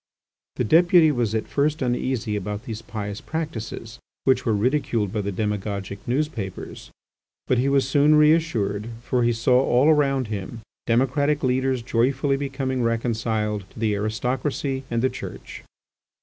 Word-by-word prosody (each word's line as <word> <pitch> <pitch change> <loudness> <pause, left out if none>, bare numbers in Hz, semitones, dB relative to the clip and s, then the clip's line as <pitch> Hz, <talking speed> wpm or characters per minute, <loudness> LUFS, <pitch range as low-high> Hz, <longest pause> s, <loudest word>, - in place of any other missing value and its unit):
The - - 0
deputy 170 - +5
was 120 -5 -1
at 110 - -2
first 150 +2 0
uneasy 120 -3 -1
about 105 +2 -4
these 110 -1 -6
pious 105 -2 -6
practices, 120 -7 -5 0.2
which 130 -1 +2
were 110 - +3
ridiculed 115 -3 0
by 105 - 0
the 100 0 -3
demagogic 100 -1 -3
newspapers, 120 - -3 0.6
but 125 - +2
he 135 +2 +2
was 135 -2 +2
soon 145 +3 +4
reassured, 150 -10 +2 0.2
for 125 0 0
he 120 0 +3
saw 125 +2 +3
all 130 +4 +3
around 135 -5 +2
him 105 +2 -5 0.3
democratic 135 +5 +1
leaders 130 -1 +1
joyfully 130 +4 +1
becoming 135 -2 -2
reconciled 115 -3 -1
to - - -13
the 110 -2 +1
aristocracy 130 +6 -2
and 115 0 -1
the 130 - +3
Church. - - -8
120 Hz, 145 wpm, -24 LUFS, 110-135 Hz, 0.6 s, deputy